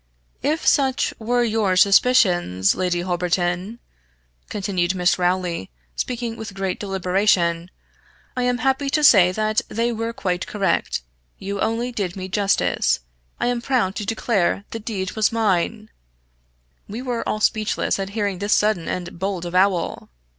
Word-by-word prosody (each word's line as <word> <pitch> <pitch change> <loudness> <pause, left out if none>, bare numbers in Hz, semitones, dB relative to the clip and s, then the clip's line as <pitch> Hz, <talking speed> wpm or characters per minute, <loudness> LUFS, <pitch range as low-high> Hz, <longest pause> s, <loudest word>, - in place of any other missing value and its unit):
"If 310 +2 -1
such 270 -3 +2
were 240 +2 +1
your 215 -5 +1
suspicions, 180 - +4
Lady 180 -1 -1
Holberton," 180 +3 -1 0.7
continued 190 -3 -1
Miss 180 0 +2
Rowley, 180 - -1 0.3
speaking 240 -2 -3
with 210 -3 -8
great 195 -1 -2
deliberation 185 -3 +1 0.7
"I 250 - -1
am 245 0 +1
happy 265 +3 0
to 305 +2 +1
say 190 -10 +7
they 215 +3 -1
were 230 0 -3
quite 180 -5 -3
correct 195 - -1 0.3
you 200 +1 -5
only 230 +3 -1
did 200 -7 -3
me 190 -1 -6
justice 200 - +1 0.4
I - - 0
am 245 -1 0
proud 240 -7 0
to 210 - -3
declare 210 -4 0
the 225 - -4
deed 205 -4 -4
was 220 -1 +1
mine 215 0 0 0.5
" - - -42
We 225 +5 -5
were 245 -3 -2
all 215 - -1
speechless 215 -1 0
at 195 0 -3
hearing 200 -3 -1
this 205 +2 +2
sudden 210 -6 +1
and 175 -1 -5
bold 190 -2 -2
avowal. 180 0 0
200 Hz, 145 wpm, -22 LUFS, 180-225 Hz, 0.7 s, say